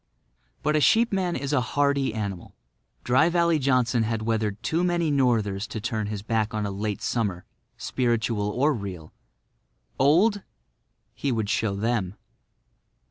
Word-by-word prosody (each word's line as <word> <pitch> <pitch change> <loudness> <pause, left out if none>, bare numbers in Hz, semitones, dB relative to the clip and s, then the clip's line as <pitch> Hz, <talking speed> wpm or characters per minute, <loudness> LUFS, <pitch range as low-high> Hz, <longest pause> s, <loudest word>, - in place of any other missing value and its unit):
But 150 +1 +1
a 155 - +3
sheepman 195 -3 +3
is 140 +2 -3
a 135 - +3
hardy 140 +1 +1
animal. 100 -5 -5 0.5
Dry 130 +7 +3
Valley 170 -2 +2
Johnson 125 -3 +2
had 110 0 -1
weathered 110 -1 -1
too 160 +9 0
many 170 -3 +1
northers 110 -7 +1
to 110 - -5
turn 110 -1 -2
his 105 -1 -5
back 110 -1 -1
on 105 -1 -1
a 100 - -3
late 105 +1 -3
summer, 100 -7 -1 0.3
spiritual 115 -4 -1
or 140 +8 +2
real. 95 - -7 0.9
Old? 185 +10 +4 0.7
He 140 - -2
would 110 -3 -1
show 110 -2 0
them. 105 -3 -1
115 Hz, 140 wpm, -25 LUFS, 105-145 Hz, 0.9 s, Old